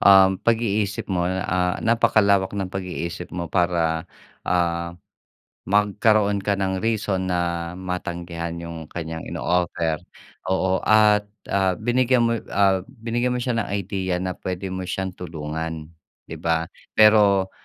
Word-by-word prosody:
um, 95 -1 +7
pag-iisip 110 -3 0
mo, 90 -1 +1
ah, 90 -1 0
napakalawak 100 -4 +3
ng 95 -2 -3
pag-iisip 90 -2 -4
mo 85 -3 -4
para, 85 -3 +1 0.4
ah, 85 -1 0 0.7
magkaroon 105 +1 +2
ka 100 +1 +1
ng 95 -1 -1
reason 100 -4 0
na 85 -1 -1
matanggihan 85 -2 -4
yung 85 -1 -7
kanyang 80 -1 -5
ino-offer. 85 -2 0 0.5
Oo 95 0 +2
at, 105 -1 +4 0.2
ah, 95 -2 +2
binigyan 125 +2 +2
mo 115 - +2 0.2
ah, 95 -2 +3
binigyan 120 0 -2
mo - - -1
siya 120 -2 -1
ng - - -1
idea 95 -2 -2
na 90 0 -2
pwede 95 +1 -4
mo 95 0 -4
siyang 95 0 -3
tulungan, 80 -2 -5 0.4
di - - -8
ba? 80 0 0 0.3
Pero, 105 -3 +5
95 Hz, 130 wpm, -23 LUFS, 85-105 Hz, 0.7 s, um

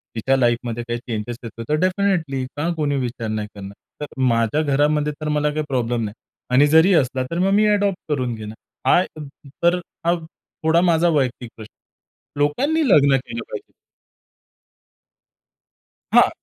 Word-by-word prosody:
तिच्या 130 +4 +1
लाईफमध्ये 120 -1 0
काही 120 0 -2
चेंजस 120 -1 -5
येतो 115 0 -7
तर 150 - +3
डेफिनेटली 185 -7 0
का 150 - -1
कोणी 150 -3 0
विचार 120 -3 -3
नाही 110 -1 -3
करणार? 100 0 -8 0.3
तर - - -2 0.2
माझ्या 115 +2 +2
घरामध्ये 150 +1 +1
तर 155 - -3
मला 150 0 +1
काही 155 +1 -1
प्रॉब्लेम 120 -3 -1
नाही 105 -1 -4 0.4
आणि 140 +3 +6
जरी 160 +6 +5
असला 130 -3 +1
तर 170 - -2
मग 190 +2 +2
मी 210 +1 +4
अडॉप्ट 200 -2 +1
करून 130 -5 -1
घेईन. 110 -1 -8 0.3
हा - - +6 0.6
तर 175 +1 +4 0.3
हा 170 - +4 0.5
थोडा 160 +2 +4
माझा 170 -1 +3
वैयक्तिक 130 -6 -1
प्रश्न 110 -1 -11 0.4
आहे. - - -15
लोकांनी 280 - +1
लग्न 140 -6 +5
केलं 115 -3 -6
पाहिजे. - - -8 2.4
हां. - - +7
140 Hz, 155 wpm, -21 LUFS, 120-160 Hz, 2.4 s, हां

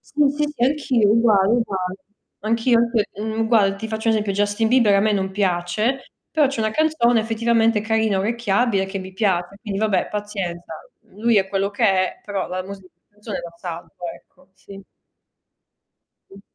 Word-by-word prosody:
Sì, 295 -2 +4
sì, 300 - 0
sì, 240 - +2
anch'io, 255 -6 +2
uguale, 215 -4 +4
uguale. 190 -6 -1 0.5
Anch'io 230 +2 +2
pe 225 -4 +2 0.2
mhmm, 220 +1 -1
guarda 205 -4 +3
ti 220 - -5
faccio 220 +1 -5
un 225 - +5
esempio 210 -2 -1
Justin 205 +2 0
Bieber 230 -3 +4
a 195 - +4
me 215 +1 +2
non 190 -1 -1
piace, 195 +6 -1 0.2
però 300 -4 +3
c'è 275 - -5
una 215 0 0
canzone 245 -6 +2
effettivamente 225 0 +1
carina, 220 -2 +1
orecchiabile 210 -1 0
che 195 +1 -5
mi 190 0 -8
piace. 190 -2 -1
Quindi 205 -3 -4
vabbè 215 -3 +1
pazienza, 195 -5 -5 0.4
lui 225 +2 +1
è 195 -1 +3
quello 195 0 -1
che 205 +3 -1
è, 190 -2 +1
però 200 -2 -3
la 185 0 -3
musica 195 -1 -10
la - - -54
canzone 210 0 -6
la 170 - -8
salvo, 170 -1 -8 0.2
ecco. - - -20
Sì. 195 0 -13 1.5
Mh. 195 - -13
210 Hz, 175 wpm, -21 LUFS, 195-230 Hz, 1.5 s, un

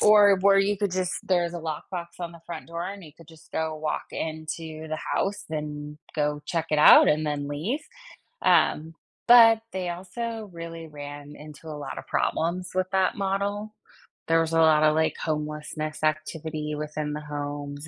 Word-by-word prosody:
Or 205 -2 +7
where 195 +1 +6
you 200 +1 +2
could 205 -1 0
just 185 -1 -1
there's 175 -2 +1
a 175 - -4
lockbox 170 +2 -5
on 170 -1 -4
the 170 - -13
front 170 -2 -7
door, 170 +1 -4
and 200 -1 -8
you 150 - -13
could 165 0 -18
just 160 0 -17
go 160 -1 -1
walk 155 0 -3
into 160 0 -5
the 155 - -2 0.2
house, 200 +1 -1
then 150 -1 -5 0.2
go 150 -1 0
check 165 -2 -2
it 155 - +2
out, 150 - +9
and 155 +1 +2
then 145 -1 -2
leave, 160 - -2 0.6
um, 160 +2 +3 0.3
but 230 -2 +8
they 185 -1 -3
also 215 +5 -5
really 165 -1 -7
ran 145 0 -9
into 150 +1 -12
a 155 - -5
lot 145 - -6
of - - -9
problems 175 +2 -1
with 185 0 0
that 190 +3 +2
model. 205 +2 -2 0.5
There 165 0 +4
was 165 0 0
a 165 - +4
lot 155 -1 +5
of, 155 0 +4
like, 160 0 +2
homelessness 155 0 -4
activity 155 0 -2
within 150 0 -4
the 150 - -4
homes 145 0 -5
160 Hz, 180 wpm, -26 LUFS, 150-185 Hz, 0.6 s, out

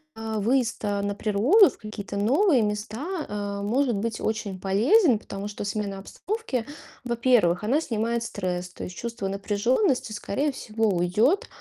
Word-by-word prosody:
а, 220 -1 -3
выезд, 235 +1 +1
а, 200 -1 0
на 200 0 -2
природу, 235 - +5
в - - -14
какие-то 210 -2 -7
новые 270 - +3
места, 220 - -3
э, 205 -1 -4
может 245 +1 +1
быть 220 +2 -3
очень 210 -4 -2
полезен, 230 - +4
потому 200 -1 -6
что 210 0 -6
смена 200 -1 -3
обстановки, 325 - -4 0.4
во-первых, 235 -7 +2
она 275 +9 +2
снимает 230 -2 -1
стресс. 180 -4 -3
То - - -9
есть 180 - -8
чувство 230 -4 -4
напряжённости, 220 - 0
скорее 215 +8 -1
всего, 225 -3 -2
уйдёт, 200 - +2
220 Hz, 150 wpm, -25 LUFS, 200-250 Hz, 0.4 s, природу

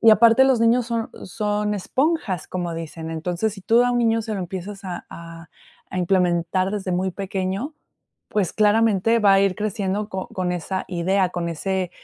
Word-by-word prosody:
y 225 - +7
aparte, 230 +4 +6
los 265 -3 +3
niños 235 +1 +3
son 230 -1 -2
son 210 +1 -1
esponjas, 255 - -1
como 175 -2 -3
dicen. 165 0 -6
Entonces, 175 +6 -2
si 195 - -10
tú 230 +6 +4
a 245 - +2
un 245 - +1
niño 225 -1 +2
se 215 0 -4
lo - - -3
empiezas 190 +2 -6
a 180 -2 -5
a 165 0 -10 0.4
a 185 - -3
implementar 180 0 +1
desde 195 -3 -3
muy 185 +1 0
pequeño, 195 - -3 0.5
pues, 200 -5 0
claramente 220 +1 +3
va 200 -2 +5
a 195 - +5
ir 195 -2 +2
creciendo 210 -1 -2
co 190 -3 -5
con 180 -1 -2
esa 185 +2 -3
idea, 185 +1 +1
con 170 -1 -3
ese 185 +2 -2
195 Hz, 185 wpm, -23 LUFS, 180-220 Hz, 0.5 s, y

